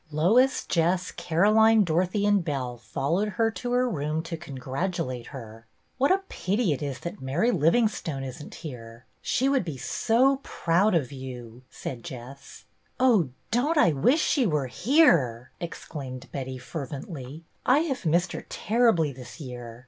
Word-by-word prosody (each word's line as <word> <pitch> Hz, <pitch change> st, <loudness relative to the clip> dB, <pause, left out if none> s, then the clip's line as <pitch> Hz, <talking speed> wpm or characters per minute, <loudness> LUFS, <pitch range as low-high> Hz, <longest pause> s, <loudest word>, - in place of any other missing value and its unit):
Lois, 220 Hz, -, +3 dB
Jess, 180 Hz, +1 st, +1 dB
Caroline, 215 Hz, +6 st, +4 dB
Dorothy, 180 Hz, +4 st, +1 dB
and 205 Hz, -3 st, +3 dB
Belle 130 Hz, -6 st, -3 dB
followed 140 Hz, -, -1 dB
her 225 Hz, -1 st, +3 dB
to 245 Hz, +2 st, -5 dB
her 250 Hz, +1 st, +3 dB
room 155 Hz, -5 st, -2 dB
to 170 Hz, 0 st, -5 dB
congratulate 135 Hz, -3 st, -4 dB
her. 115 Hz, -4 st, -10 dB
" -, -, -43 dB
What 275 Hz, +5 st, +4 dB
a 390 Hz, +1 st, +2 dB
pity 200 Hz, -2 st, 0 dB
it 140 Hz, -, -5 dB
is 140 Hz, -3 st, -4 dB
that 175 Hz, +4 st, -6 dB
Mary 150 Hz, -, +1 dB
Livingstone 165 Hz, -, +1 dB
is 130 Hz, +2 st, -7 dB
n't -, -, -11 dB
here! 120 Hz, -6 st, -9 dB, 0.2 s
She 260 Hz, -, +1 dB
would 275 Hz, -4 st, +2 dB
be 160 Hz, -6 st, -5 dB
so 245 Hz, -, +2 dB
proud 185 Hz, -2 st, +1 dB
of 145 Hz, -5 st, 0 dB
you," 125 Hz, -3 st, -8 dB
said 120 Hz, -3 st, -7 dB
Jess. 130 Hz, +2 st, -10 dB, 0.2 s
" -, -, -40 dB
Oh, 225 Hz, -, +4 dB, 0.2 s
dotUt 280 Hz, +8 st, +1 dB
I 175 Hz, -, +5 dB
wish 245 Hz, -, +3 dB
she 265 Hz, -6 st, +2 dB
were 150 Hz, -5 st, 0 dB
here! 135 Hz, -, +3 dB
" -, -, -38 dB
ex 170 Hz, -, -6 dB
claimed 130 Hz, -5 st, -7 dB
Betty, 130 Hz, -1 st, -5 dB
fervently. 140 Hz, +2 st, -7 dB
" -, -, -41 dB
I -, -, +3 dB
have 275 Hz, -6 st, -2 dB
missed 175 Hz, +2 st, +2 dB
her -, -, -7 dB
terribly 215 Hz, -, +2 dB
this 125 Hz, +5 st, -11 dB
year. 120 Hz, -4 st, -8 dB
160 Hz, 170 wpm, -26 LUFS, 130-215 Hz, 0.2 s, I